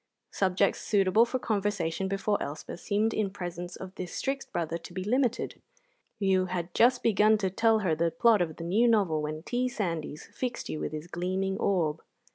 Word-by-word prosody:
Subjects 190 Hz, +1 st, +1 dB
suitable 205 Hz, +2 st, +3 dB
for 255 Hz, -, -1 dB
conversation 200 Hz, -6 st, -1 dB
before 195 Hz, +1 st, 0 dB
Elspeth 150 Hz, +4 st, -6 dB
seemed 215 Hz, +3 st, 0 dB
in 210 Hz, -2 st, 0 dB
presence 175 Hz, -2 st, -6 dB
of 190 Hz, 0 st, -8 dB
this 180 Hz, -2 st, -6 dB
strict 270 Hz, 0 st, -3 dB
brother 170 Hz, 0 st, -2 dB
to 170 Hz, -, -11 dB
be 185 Hz, -, -2 dB
limited. 245 Hz, +3 st, 0 dB, 0.6 s
You 190 Hz, -2 st, +2 dB
had 175 Hz, -1 st, -4 dB
just 245 Hz, +1 st, +4 dB
begun 215 Hz, 0 st, +4 dB
to 190 Hz, -3 st, -1 dB
tell 225 Hz, +3 st, +3 dB
her 165 Hz, -, +2 dB
the 165 Hz, +2 st, +1 dB
plot 230 Hz, -1 st, +4 dB
of 160 Hz, -3 st, -1 dB
the 165 Hz, -, -7 dB
new 205 Hz, +8 st, +3 dB
novel 195 Hz, -9 st, +3 dB
when 155 Hz, +1 st, -4 dB
T. 250 Hz, +5 st, -1 dB
Sandys 165 Hz, -9 st, -4 dB
fixed 250 Hz, -2 st, -4 dB
you 155 Hz, -, -3 dB
with -, -, -3 dB
his 155 Hz, 0 st, -5 dB
gleaming 185 Hz, +3 st, -2 dB
orb. 165 Hz, -5 st, +1 dB
190 Hz, 185 wpm, -29 LUFS, 170-215 Hz, 0.6 s, just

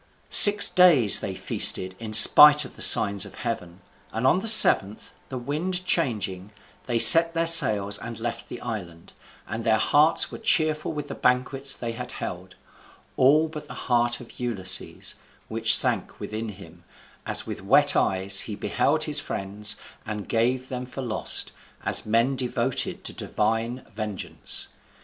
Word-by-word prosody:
Six 205 Hz, 0 st, +8 dB
days 160 Hz, -, +3 dB
they -, -, -8 dB
feasted 95 Hz, 0 st, +1 dB
in 110 Hz, -1 st, -10 dB
spite 150 Hz, +6 st, +8 dB
of -, -, -15 dB
the -, -, -15 dB
signs 100 Hz, -1 st, +3 dB
of 100 Hz, -, -12 dB
heaven, 90 Hz, -5 st, -9 dB, 0.3 s
and 115 Hz, +3 st, -6 dB
on 160 Hz, +7 st, +1 dB
the 225 Hz, -, -7 dB
seventh, 110 Hz, -, +3 dB, 0.2 s
the 130 Hz, -, -8 dB
wind 170 Hz, +8 st, -6 dB
changing, 105 Hz, -, -4 dB, 0.4 s
they 120 Hz, -2 st, -3 dB
set 165 Hz, +7 st, +7 dB
their 165 Hz, 0 st, -2 dB
sails 105 Hz, -11 st, +3 dB
and 115 Hz, -1 st, -11 dB
left 120 Hz, +1 st, -8 dB
the -, -, -10 dB
island; 90 Hz, -8 st, -10 dB, 0.3 s
and 110 Hz, +2 st, -8 dB
their 110 Hz, -1 st, 0 dB
hearts 150 Hz, +7 st, +1 dB
were -, -, -11 dB
cheerful 155 Hz, -1 st, -2 dB
with 150 Hz, -2 st, -9 dB
the -, -, -9 dB
banquets 130 Hz, +2 st, -3 dB
they 120 Hz, -1 st, -8 dB
had 125 Hz, +2 st, -10 dB
held; 90 Hz, +1 st, -10 dB, 0.6 s
all 150 Hz, +5 st, +1 dB
but 155 Hz, -1 st, -12 dB
the -, -, -12 dB
heart 120 Hz, -1 st, -3 dB
of 120 Hz, -, -17 dB
Ulysses, 95 Hz, -6 st, -4 dB, 0.4 s
which -, -, +5 dB
sank -, -, -3 dB
within 110 Hz, +1 st, -8 dB
him, 100 Hz, -, -16 dB, 0.4 s
as -, -, -2 dB
with -, -, -9 dB
wet -, -, +1 dB
eyes 95 Hz, +1 st, +1 dB
he 105 Hz, -, -7 dB
beheld 150 Hz, +8 st, -3 dB
his 150 Hz, -2 st, +1 dB
friends, 105 Hz, -3 st, -5 dB, 0.3 s
and 105 Hz, -2 st, -9 dB
gave 125 Hz, +3 st, -3 dB
them 125 Hz, -1 st, -8 dB
for 135 Hz, +1 st, -10 dB
lost, 110 Hz, -3 st, 0 dB, 0.3 s
as -, -, 0 dB
men 115 Hz, +5 st, -1 dB
devoted 125 Hz, 0 st, -5 dB
to -, -, -5 dB
divine 115 Hz, +4 st, -5 dB
vengeance. 105 Hz, -2 st, -6 dB
120 Hz, 160 wpm, -21 LUFS, 105-145 Hz, 0.6 s, Six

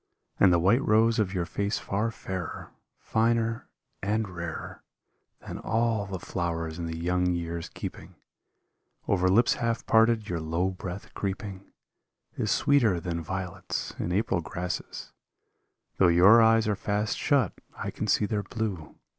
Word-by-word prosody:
And 95 Hz, -, +6 dB
the 85 Hz, -, +5 dB
white 100 Hz, +10 st, +3 dB
rose 115 Hz, +2 st, +3 dB
of 100 Hz, -4 st, +1 dB
your 90 Hz, -3 st, -1 dB
face 100 Hz, +4 st, -2 dB
far 105 Hz, +4 st, -1 dB
fairer, 95 Hz, -6 st, -6 dB, 0.3 s
Finer, 115 Hz, 0 st, 0 dB, 0.3 s
and 105 Hz, +2 st, 0 dB
rarer 85 Hz, -2 st, -6 dB, 0.6 s
Than -, -, -6 dB
all 115 Hz, -2 st, 0 dB
the 95 Hz, -2 st, -4 dB
flowers 85 Hz, -2 st, -3 dB
in 85 Hz, -, -3 dB
the 80 Hz, 0 st, -4 dB
young 90 Hz, +2 st, +1 dB
year's 85 Hz, -1 st, -4 dB
keeping; -, -, -8 dB, 0.9 s
Over 95 Hz, -2 st, +2 dB
lips 115 Hz, +6 st, +4 dB
half 115 Hz, 0 st, -2 dB
parted 110 Hz, -1 st, +4 dB
your 85 Hz, -4 st, -2 dB
low 85 Hz, +4 st, -1 dB
breath 90 Hz, +1 st, -7 dB
creeping 100 Hz, -1 st, -5 dB, 0.7 s
Is -, -, -1 dB
sweeter 120 Hz, -11 st, +3 dB
than 85 Hz, 0 st, -3 dB
violets 95 Hz, +2 st, -4 dB
in 85 Hz, -, -2 dB
April 100 Hz, -2 st, +1 dB
grasses; 90 Hz, +2 st, -5 dB, 0.9 s
Though 95 Hz, -, +5 dB
your 95 Hz, +7 st, +7 dB
eyes 115 Hz, 0 st, +4 dB
are 105 Hz, -, +1 dB
fast 105 Hz, +2 st, -1 dB
shut 135 Hz, -9 st, +2 dB, 0.2 s
I -, -, -4 dB
can -, -, -4 dB
see -, -, +3 dB
their 105 Hz, 0 st, -1 dB
blue. 100 Hz, -6 st, -4 dB
95 Hz, 145 wpm, -28 LUFS, 90-110 Hz, 0.9 s, your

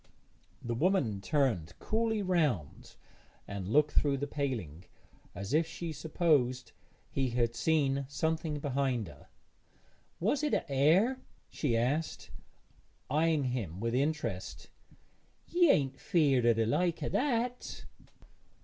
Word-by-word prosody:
The 120 Hz, -, -2 dB
woman 125 Hz, -, +1 dB
turned 110 Hz, -, 0 dB
coolly 220 Hz, -1 st, 0 dB
round 150 Hz, -, -1 dB, 0.5 s
and 100 Hz, -2 st, -5 dB
looked 150 Hz, +7 st, +3 dB
through 140 Hz, -2 st, +2 dB
the 140 Hz, -, -2 dB
paling, 115 Hz, -, -4 dB, 0.5 s
as 100 Hz, +7 st, -5 dB
if 160 Hz, +1 st, +3 dB
she 165 Hz, 0 st, -5 dB
supposed 145 Hz, -6 st, +1 dB, 0.4 s
he 135 Hz, -2 st, 0 dB
had 120 Hz, -1 st, 0 dB
seen 140 Hz, -1 st, +1 dB
something 160 Hz, +1 st, -1 dB
behind 135 Hz, -6 st, -1 dB
her. -, -, -16 dB, 0.9 s
'Was't 285 Hz, -, +1 dB
a -, -, +1 dB
haër?' 165 Hz, -, +3 dB, 0.3 s
she 120 Hz, -7 st, 0 dB
asked, 140 Hz, +8 st, -1 dB, 0.8 s
eyeing 155 Hz, 0 st, +2 dB
him 115 Hz, -10 st, -3 dB
with 115 Hz, +2 st, -2 dB
interest; 140 Hz, -8 st, -2 dB, 0.7 s
'ye 350 Hz, -2 st, +3 dB
ain't 135 Hz, -, +2 dB
feared 140 Hz, -8 st, +2 dB
o' 120 Hz, -, +6 dB
the 115 Hz, 0 st, +1 dB
like 170 Hz, +9 st, 0 dB
o' -, -, -1 dB
that?' 245 Hz, -2 st, -1 dB
140 Hz, 120 wpm, -31 LUFS, 120-165 Hz, 0.9 s, o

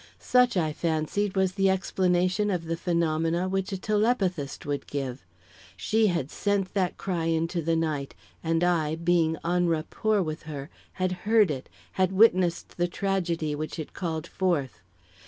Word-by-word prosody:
Such, 250 Hz, -4 st, +3 dB
I 155 Hz, -3 st, +1 dB
fancied, 170 Hz, +6 st, -1 dB
was 190 Hz, -1 st, +2 dB
the 195 Hz, 0 st, +2 dB
explanation 185 Hz, +1 st, +1 dB
of 180 Hz, -4 st, -1 dB
the 165 Hz, +1 st, -1 dB
phenomena 170 Hz, 0 st, 0 dB
which 190 Hz, +1 st, -1 dB
a 195 Hz, -, -2 dB
telepathist 195 Hz, -, 0 dB
would 145 Hz, -1 st, -3 dB
give. 135 Hz, -2 st, -4 dB, 0.5 s
She 220 Hz, 0 st, +2 dB
had 170 Hz, -7 st, -1 dB
sent 200 Hz, -2 st, -1 dB
that 185 Hz, -3 st, 0 dB
cry 175 Hz, -4 st, -2 dB
into 165 Hz, +1 st, 0 dB
the 165 Hz, +1 st, +1 dB
night, 155 Hz, -4 st, -2 dB, 0.3 s
and 165 Hz, +1 st, +1 dB
I, 160 Hz, -3 st, +2 dB
being 165 Hz, -1 st, +2 dB
en 175 Hz, +1 st, +2 dB
rapport 190 Hz, +6 st, 0 dB
with 155 Hz, -1 st, -4 dB
her, 145 Hz, +1 st, -6 dB, 0.2 s
had 185 Hz, -1 st, -1 dB, 0.2 s
heard 215 Hz, -6 st, +5 dB
it 135 Hz, -2 st, -5 dB, 0.2 s
had 185 Hz, 0 st, +1 dB
witnessed 185 Hz, -4 st, +3 dB
the 175 Hz, 0 st, +2 dB
tragedy 175 Hz, -5 st, -1 dB
which 155 Hz, +2 st, -4 dB
called 165 Hz, -3 st, -3 dB
it -, -, -15 dB
forth. 155 Hz, -, -1 dB
175 Hz, 155 wpm, -27 LUFS, 160-190 Hz, 0.5 s, heard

